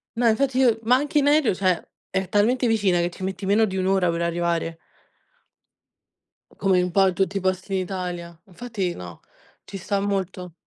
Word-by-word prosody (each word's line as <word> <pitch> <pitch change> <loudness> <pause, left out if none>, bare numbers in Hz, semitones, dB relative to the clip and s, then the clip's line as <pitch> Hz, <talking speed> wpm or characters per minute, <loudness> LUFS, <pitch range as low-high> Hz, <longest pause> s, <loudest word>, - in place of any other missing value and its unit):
No, 235 0 +2
infatti 260 +3 +1
io 240 -4 +3
ma 240 +3 +4
anche 295 +3 +1
in 285 - +1
aereo, 295 -5 +4
cioè, 185 -2 0 0.2
è 190 0 -2
talmente 225 +7 +2
vicina 205 -6 +2
che 175 +1 0
ci 185 - -10
metti 190 +1 -4
meno 210 +3 +3
di 190 -2 -4
1 185 - 0
ora 190 -2 +2
per 170 0 -1
arrivare. 170 -1 -1 1.8
Come 190 -2 +2
in 180 0 0
po' 190 +1 +4
tutti 195 +2 -1
i - - 0
posti 185 +1 -2
in 190 - +1
Italia. 180 -2 -5
Infatti 195 -3 -4
no, 90 -1 -9 0.5
ci 195 - -7
sta 200 +2 -2
molto. 190 -3 -3
190 Hz, 185 wpm, -23 LUFS, 180-220 Hz, 1.8 s, ma